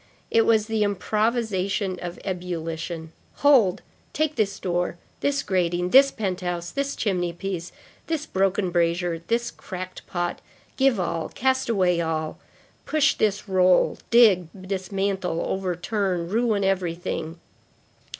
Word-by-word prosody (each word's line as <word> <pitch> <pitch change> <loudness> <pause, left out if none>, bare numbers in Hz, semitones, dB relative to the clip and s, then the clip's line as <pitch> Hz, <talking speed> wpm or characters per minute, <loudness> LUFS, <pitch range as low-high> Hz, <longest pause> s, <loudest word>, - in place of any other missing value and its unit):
It 225 0 +4
was 220 -2 +4
the 220 -1 0
improvisation 205 -2 0
of 175 0 -5
the - - -16
ebullition. 165 -2 -4 0.3
Hold! 225 -10 +5 0.3
take 310 0 0
this 205 -2 0
door! 175 -1 -1 0.2
this 285 0 0
grating! 180 -1 0
this 275 +1 +8
penthouse! 180 -6 -3
this 280 0 -2
chimney 180 -5 -1
piece! 180 -1 -5 0.4
this 320 -2 -2
broken 190 - 0
brazier! 170 0 +1
this 235 +1 0
cracked 185 0 -8
pot! 175 -2 -3 0.3
Give 265 -5 +3
all! 170 -2 -2
cast 260 0 0
away 180 -6 +2
all! 160 -1 -2 0.5
Push 310 -2 +3
this 210 0 0
roll, 185 -1 +3
dig, 210 -8 +6 0.2
dismantle, 190 -2 -1
overturn, 185 -1 -1
ruin 220 -1 +1
everything! 175 -3 -2
190 Hz, 120 wpm, -24 LUFS, 175-220 Hz, 0.5 s, this